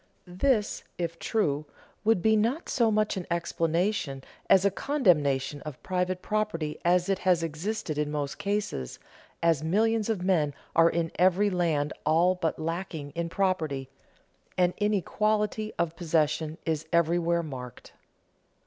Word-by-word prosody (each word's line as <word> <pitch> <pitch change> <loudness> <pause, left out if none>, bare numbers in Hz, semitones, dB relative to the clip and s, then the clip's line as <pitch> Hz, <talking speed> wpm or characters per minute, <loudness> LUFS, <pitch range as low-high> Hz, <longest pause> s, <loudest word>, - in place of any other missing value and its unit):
This, 210 +5 0
if 170 -1 -3
true, 155 -10 0 0.4
would 220 -5 +2
be 220 0 +5
not 235 +10 0
so 235 -3 +3
much 215 -1 +1
an 180 - -5
explanation 170 -3 -1 0.3
as 195 0 +6
a 200 - +4
condemnation 145 - +1
of 150 -4 -9
private 180 0 -1
property 210 -8 -2
as 175 +1 +3
it 195 -1 0
has 180 -3 +2
existed 165 0 -3
in 150 -1 0
most 145 -1 -3
cases, 200 - -2 0.5
as 165 -3 +3
millions 220 +6 +1
of 205 -5 -1
men 160 -7 +1 0.2
are 165 0 +6
in 165 -1 -1
every 190 +3 +4
land 160 -5 0
all 170 +4 +4
but 165 -3 -2
lacking 160 -3 -4
in 170 0 -3
property, 160 -8 -1 0.7
and 180 -1 +3
inequality 210 +1 0
of 170 -1 -1
possession 155 -2 0
is 160 -1 -1
everywhere 170 0 +2
marked. 125 -6 -9
170 Hz, 140 wpm, -28 LUFS, 155-200 Hz, 0.7 s, as